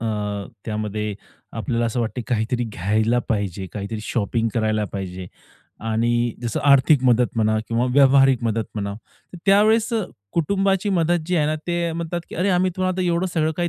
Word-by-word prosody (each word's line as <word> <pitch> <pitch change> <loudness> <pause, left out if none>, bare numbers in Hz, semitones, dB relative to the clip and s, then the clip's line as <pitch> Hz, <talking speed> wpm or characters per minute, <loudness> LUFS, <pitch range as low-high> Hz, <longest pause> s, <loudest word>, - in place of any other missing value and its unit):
अ, 115 - -4 0.6
त्यामध्ये 105 -1 -3 0.4
आपल्याला 120 0 -1
असं 115 +2 -1
वाटतं, 115 +2 -2
काहीतरी 120 +1 0
घ्यायला 110 +3 0
पाहिजे. 100 -3 -2
काहीतरी 105 +1 -5
शॉपिंग 115 +1 -1
करायला 110 -2 +1
पाहिजे. 95 -2 -5 0.6
आणि 120 +1 +1
जसं 120 +6 -2
आर्थिक 140 0 +5
मदत 125 0 +4
म्हणा 110 0 +2
किंवा 120 +2 +1
व्यावहारिक 135 -2 +5
मदत 115 -1 0
म्हणा. 100 -1 -3 0.4
तर 180 - -9
त्यावेळेस 215 +3 +4 0.4
कुटुंबाची 195 +4 +1
मदत 175 -1 +2
जी 180 0 0
आहे 150 -2 +2
ना, 155 - 0
ते 170 -1 -1
म्हणतात 170 +1 -3
की - - -7
"अरे, 185 +4 +1
आम्ही 185 0 +2
तुला 185 0 0
आता 185 0 -1
एवढं 175 +1 +1
सगळं 160 -1 +1
काही 175 -1 0
120 Hz, 165 wpm, -22 LUFS, 110-170 Hz, 0.6 s, आर्थिक